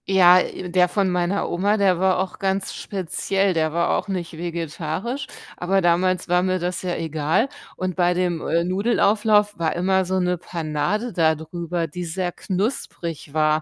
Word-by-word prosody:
Ja, 185 -2 +7
äh, 180 0 -4
der 180 0 +4
von 195 0 +1
meiner 180 +2 0
Oma, 200 +5 +1
der 190 -4 +3
war 190 0 +3
auch 190 -1 -3
ganz 195 0 -1
speziell. 195 +1 -1
Der 160 -2 +1
war 170 +2 +1
auch - - -8
nicht 180 -4 -4
vegetarisch, 170 - -4 0.3
aber 190 +2 +1
damals 180 +1 +2
war 180 0 +3
mir 185 0 +1
das 180 0 -3
ja 180 -1 -2
egal 160 - 0 0.3
und 185 -1 -3
bei 180 -1 +2
dem, 175 -2 0
äh, 170 +1 +2
Nudelauflauf 210 +2 +2
war 165 -1 0
immer 190 +2 +2
so 190 +1 0
'ne 180 0 +1
Panade 170 +8 -2
dadrüber, 165 +1 0
die 180 +4 -6
sehr 175 +2 -2
knusprig 180 - -4
war. 155 0 +3
180 Hz, 170 wpm, -22 LUFS, 170-190 Hz, 0.3 s, Ja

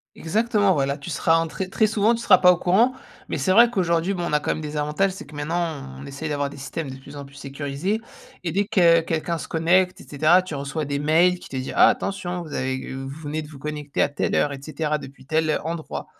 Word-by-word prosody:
Exactement 205 +2 +1
voilà, 140 0 0
tu 140 - -9
seras 165 0 +2
en 165 - -1
très 185 +3 -5
très 215 +3 +2
souvent 215 +2 +2
tu 230 - -4
seras - - +7
pas 180 0 +6
au 175 - -1
courant, 205 +9 +3 0.4
mais - - -1
c'est 140 +6 0
vrai 235 +5 +7
qu'aujourd'hui 175 -3 +1
bon 175 -2 -3
on - - -4
a 150 - +3
quand - - -2
même - - -3
des 150 0 -5
avantages, 150 +6 0
c'est 195 - -9
que 150 - -15
maintenant 160 0 -2 0.2
on 140 - -9
essaye 140 +3 -6
d'avoir 145 -1 -1
des 145 - -11
systèmes 140 +1 -5
de 130 - -7
plus 140 +2 -12
en 140 - -7
plus 140 0 -15
sécurisés, 140 +8 -3 0.5
et 170 - -2
dès 200 +3 +1
que 175 -6 +5
quelqu'un 165 +1 -2
se - - -7
connecte 180 +3 +2
et - - -15
cetera 155 +5 +3
tu 185 -4 -7
reçois 140 +2 -3
des 140 0 -2
mails 170 +5 +3
qui - - -12
te 135 - -6
dit: 130 +1 -4
«Ah! - - +7
Attention 180 -3 -2
vous 155 - -10
avez, 130 -1 -3
heu, 135 0 -5
vous 135 +3 -8
venez 150 +1 -3
de 150 - -9
vous 150 - -12
connecter 150 0 -3
à - - +2
telle 145 - -1
heure, 145 - +2
et 140 - -7
cetera, 150 +1 -2
depuis 135 -1 -12
tel, 155 +3 0
heu, 155 - +2
endroit» 165 0 -5
160 Hz, 265 wpm, -23 LUFS, 145-180 Hz, 0.5 s, seras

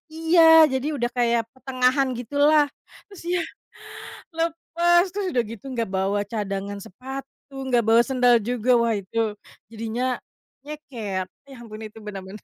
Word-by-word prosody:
Iya 325 +1 +3 0.3
jadi 265 +3 -1
udah 240 -2 -1
kayak 235 -1 +3
pertengahan 260 0 +1
gitulah 290 +5 +3 0.4
terus 400 -2 -13
ya, 355 - +1 1.0
lepas! 335 +1 +2
Terus 400 +2 -3
udah 245 - +1
gitu 230 - -10 0.2
gak 225 - -1
bawa 195 +2 0
cadangan 200 -1 -3
sepatu, 270 +5 -10 0.2
gak 235 - +3
bawa 230 +1 +6
sendal 250 -2 +4
juga, 245 0 -2
wah 230 -1 +1
itu 195 +4 -9 0.5
jadinya 230 +2 -4 0.6
nyeker, 235 -11 -5 0.3
ya 270 - -11
ampun 215 -2 -10
itu 215 - -18
benar-benar. 195 0 -8
245 Hz, 135 wpm, -24 LUFS, 215-285 Hz, 1.0 s, bawa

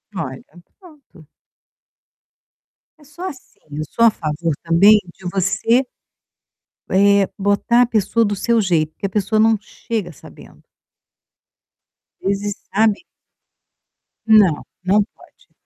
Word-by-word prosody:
Olha, 130 -7 -5 0.4
pronto. 300 - -19 1.7
É - - -19
só 300 +5 -12
assim, 275 -8 -12
eu 150 +2 -4
sou 230 - +2
a 230 - +6
favor 160 -1 -3
também 185 +6 +5 0.2
de 190 - -18
você 200 +6 +1 1.1
eh, 200 +1 +3
botar 205 +4 +2
a - - +2
pessoa 230 0 +1
do 205 -1 -1
seu 235 +4 +1
jeito, 165 -5 0
porque - - -7
a - - -1
pessoa 210 +2 0
não 220 0 +4
chega 210 -2 -5
sabendo. 150 - -16 1.6
Às 195 - 0
vezes, 205 0 -4 0.2
sabe 215 - +2 1.2
Não, 205 -8 +4 0.2
não 200 +3 +3
pode. - - -23
205 Hz, 120 wpm, -19 LUFS, 185-230 Hz, 1.7 s, a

